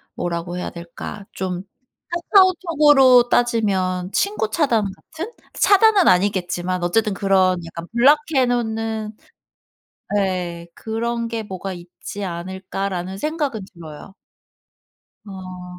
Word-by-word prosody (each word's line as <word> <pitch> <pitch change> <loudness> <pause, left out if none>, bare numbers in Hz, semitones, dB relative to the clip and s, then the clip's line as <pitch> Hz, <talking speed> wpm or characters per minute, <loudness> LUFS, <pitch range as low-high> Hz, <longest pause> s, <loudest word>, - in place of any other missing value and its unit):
뭐라고 175 0 -3
해야 - - -3
될까? 170 +4 -8
좀 185 -1 -4 0.5
카카오톡으로 315 - +5
따지면 195 -7 +1
친구 400 - 0
차단 230 -6 +1
같은? 325 - -8 0.2
차단은 405 -1 +5
아니겠지만 180 -1 0
어쨌든 210 +4 +1
그런 190 -2 +2
약간 170 +1 -8
블락 270 +6 +6 0.2
해 260 - +4
놓는 220 -3 -2 1.0
네 180 -4 -2
'그런 230 +1 -3
게 230 -1 -4
뭐가 190 -1 -6
있지 175 +3 -8
않을까.'라는 190 +1 -4
생각은 295 -5 -2
들어요. 165 +2 -11 1.1
아. 185 -2 -9
200 Hz, 240 characters per minute, -21 LUFS, 180-245 Hz, 1.1 s, 블락